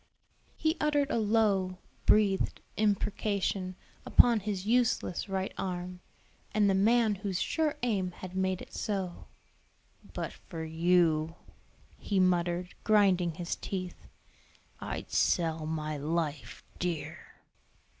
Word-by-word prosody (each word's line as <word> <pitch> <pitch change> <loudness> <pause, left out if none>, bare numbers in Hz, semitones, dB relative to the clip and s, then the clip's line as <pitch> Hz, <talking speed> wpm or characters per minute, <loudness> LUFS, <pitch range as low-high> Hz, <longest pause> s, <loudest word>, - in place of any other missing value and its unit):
He 315 +2 +1
uttered 290 -2 +2
a - - +1
low, 205 -4 +2 0.3
breathed 205 -3 +3 0.2
imprecation 200 -2 0 0.3
upon 235 -2 +5
his 200 -2 -3
useless 230 -5 +1
right 190 0 -2
arm, 180 -1 -4 0.6
and 210 -1 +4
the 195 - +4
man 220 +3 +4
whose 195 -2 -3
sure 310 - 0
aim 200 -7 +1
had 185 +1 -9
made 190 -1 0
it - - -15
so. 190 -4 -3 0.9
"But - - -3
for 165 -3 -8
you," 165 -1 +2 0.6
he 200 -2 0
muttered, 180 -1 +1
grinding 190 -6 +3
his 170 0 -3
teeth, 185 -2 -6 0.7
"I'd - - -5
sell 160 -2 +1
my 155 -1 -3
life 150 -4 -3 0.2
dear." 175 -3 -4
185 Hz, 115 wpm, -30 LUFS, 175-210 Hz, 0.9 s, upon